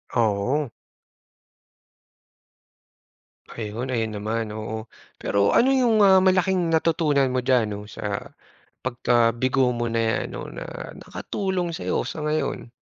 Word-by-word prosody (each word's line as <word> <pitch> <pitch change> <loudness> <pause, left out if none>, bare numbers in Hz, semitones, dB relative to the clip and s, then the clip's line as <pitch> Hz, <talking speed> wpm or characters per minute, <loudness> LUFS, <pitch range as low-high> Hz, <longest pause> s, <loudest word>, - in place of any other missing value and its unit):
Oo. 120 +5 +1 2.8
Ayun. 115 +3 -4
Ayun 110 -2 -1
naman, 110 +1 -2
oo. 110 +1 -5 0.3
Pero 100 0 +2
ano 255 - +5
yung, 240 -5 +3
ah, 190 -1 +7
malaking 185 -2 +2
natutunan 155 -4 +2
mo 130 - +1
diyan 125 -2 +3
‘no, 105 0 -5
sa - - -5 0.5
pagkabigo 120 +1 +2
mo 120 0 -1
na 115 - 0
‘yan 110 - 0
‘no, - - -6
na - - -6 0.3
nakatulong 185 -4 -3
sa'yo - - -1
sa 155 - -5
ngayon? 150 -5 -2
130 Hz, 115 wpm, -24 LUFS, 115-165 Hz, 2.8 s, ah